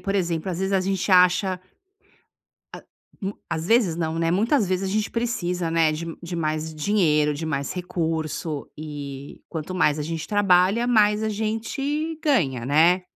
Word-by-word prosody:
por 195 -1 -3
exemplo, 175 -2 -1
às 175 - -4
vezes 190 +1 -1
a 195 - +3
gente 195 +1 -1
acha 180 +1 +4 1.2
a - - -9 0.4
mu 195 +1 -4
às 160 0 -2
vezes 215 -6 +3
não, 165 -1 -2
né. 165 0 +1
Muitas 215 - +2
vezes 185 +1 -1
a - - -3
gente 215 0 0
precisa, 180 -8 -2
né, 165 -1 +3
de 165 +2 -5 0.2
de 175 0 -5
mais 155 -1 -2
dinheiro, 150 -3 +2
de 155 +3 -5
mais 140 -3 -2
recurso 160 -4 -3
e 145 -2 -8
quanto 165 +2 -5
mais 155 -5 +2
a - - -2
gente 160 +1 -4
trabalha, 200 +2 +3
mais 215 -3 +3
a 220 - 0
gente 275 +9 -2
ganha, 140 - +1
né. 165 +6 +4
180 Hz, 170 wpm, -24 LUFS, 160-205 Hz, 1.2 s, acha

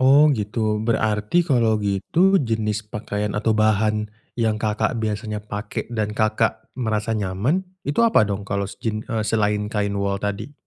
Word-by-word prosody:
Oh, 140 +3 +7
gitu. 105 -2 -1
Berarti 110 +6 +1
kalau 115 -5 +3
gitu 165 - +3
jenis 110 -3 -1
pakaian 105 -1 -3
atau 110 +1 +2
bahan 110 0 +2 0.3
yang 110 -2 +2
Kakak 110 +2 0
biasanya 105 -1 -3
pakai 105 0 -4
dan 105 -2 -1
Kakak 110 0 +1
merasa 110 -2 -1
nyaman 105 - 0 0.2
itu 145 +7 0
apa 230 - +5
dong 100 0 -3
kalau 100 0 -3
jin 110 -1 -2
eee, 110 -1 -2
selain 105 -1 +1
kain 105 -2 -1
wol 100 0 0
tadi? 100 +7 -4
110 Hz, 150 wpm, -22 LUFS, 105-115 Hz, 0.3 s, Oh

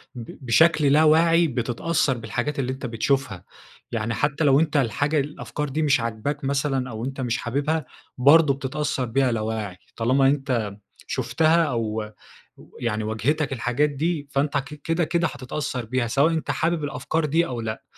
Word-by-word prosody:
ب 115 -2 -9
بشكل 155 +5 +4
لا 155 +2 +5
واعي 165 +2 +5
بتتأثّر 130 +3 0
بالحاجات 135 +5 -3
اللي 130 -1 -1
أنت 135 - -6
بتشوفها، 115 -4 -1 0.5
يعني 115 0 -2
حتى 145 +5 0
لو 140 0 +5
أنت 155 -2 +1
الحاجة 145 +5 +1
الأفكار 150 0 -4
دي 155 +4 -2
مش 140 -4 +3
عاجباك 115 +6 -3
مثلًا 135 -2 0
أو 110 +1 -5
أنت 135 0 -5
مش 120 0 -1
حاببها، 145 +6 -1 0.3
برضه 145 +2 +6
بتتأثّر 140 -1 -2
بيها 130 +2 +1
لا 110 -2 -1
واعي، 110 -4 -4 0.2
طالما 130 +4 +3
أنت 130 -7 0 0.4
شُفتها 165 +1 +2
أو 110 -5 -2 0.7
يعني 110 -2 -1
واجهتك 135 +7 -1
الحاجات 125 +4 0
دي 145 +1 -2
فأنت 140 +1 0
ك 135 - -1 0.2
كده 165 +1 0
كده 170 +1 +1
هتتأثّر 130 -2 -4
بيها، 125 +1 -1
سواء 140 +7 +2
أنت 160 - -1
حابب 165 -1 0
الأفكار 145 +3 -2
دي 165 +3 +2
أو 120 -6 -4
لأ، 110 -1 -5
135 Hz, 165 wpm, -24 LUFS, 120-150 Hz, 0.7 s, برضه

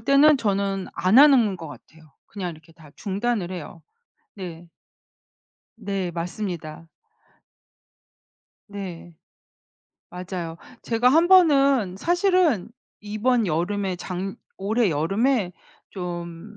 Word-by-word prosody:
때는 275 +5 +5
저는 200 -4 -1
안 190 +7 +4
하는 250 -9 +6
것 165 -3 -9
같아요. 155 0 -15
그냥 190 -3 -5
이렇게 160 0 -15
다 160 -3 -17
중단을 205 -1 -2
해요. 170 -1 -8 0.5
네. 175 -3 -8 1.1
네 195 -4 -3
맞습니다. 170 -2 -5 1.8
네. 180 -4 -8 1.0
맞아요. 180 -2 -6 0.3
제가 235 +1 +2
1 325 +6 +4
번은 275 - +4
사실은 350 - +2 0.3
이번 215 +3 0
여름에 185 +3 -1
작 180 0 -6 0.4
올해 220 +3 +1
여름에 195 - 0 0.4
좀 175 +2 -7
195 Hz, 185 characters per minute, -24 LUFS, 175-240 Hz, 1.8 s, 하는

